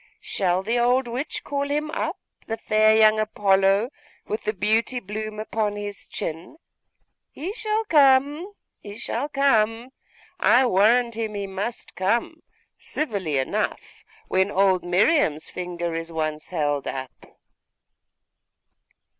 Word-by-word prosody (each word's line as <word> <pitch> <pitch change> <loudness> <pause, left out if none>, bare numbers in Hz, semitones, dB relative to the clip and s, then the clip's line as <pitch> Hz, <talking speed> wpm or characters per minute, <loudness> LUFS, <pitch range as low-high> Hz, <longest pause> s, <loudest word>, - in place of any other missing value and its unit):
'Shall 185 -1 -1
the 230 +4 0
old 245 +1 +2
witch 255 +6 -4
call 285 0 -2
him 300 +1 -1
up, - - -2 0.3
the 225 - -3
fair 215 0 +3
young 215 0 +5
Apollo, 200 +1 +2 0.3
with 215 +2 -4
the 210 - +1
beauty 220 +5 +1
bloom 215 0 -6
upon 215 -1 -2
his 205 -1 -7
chin? 165 - -6 0.7
He 345 +8 -6
shall 440 -1 -1
come! 295 +3 +3 0.3
He 205 0 -10
shall 270 +6 -3
come! 235 -4 +2 0.5
I 260 +2 +5
warrant 235 +3 +3
him 220 -2 -3
he 200 -1 -3
must 195 +5 -5
come, 195 +6 -1 0.4
civilly 195 - -2
enough, 130 - -3 0.2
when 190 +1 +2
old 190 -2 +2
Miriam's 180 - +2
finger 175 -2 -4
is 165 0 -5
once 155 -1 -3
held 145 -5 -1
up. 130 -1 -7
215 Hz, 125 wpm, -24 LUFS, 190-250 Hz, 0.7 s, young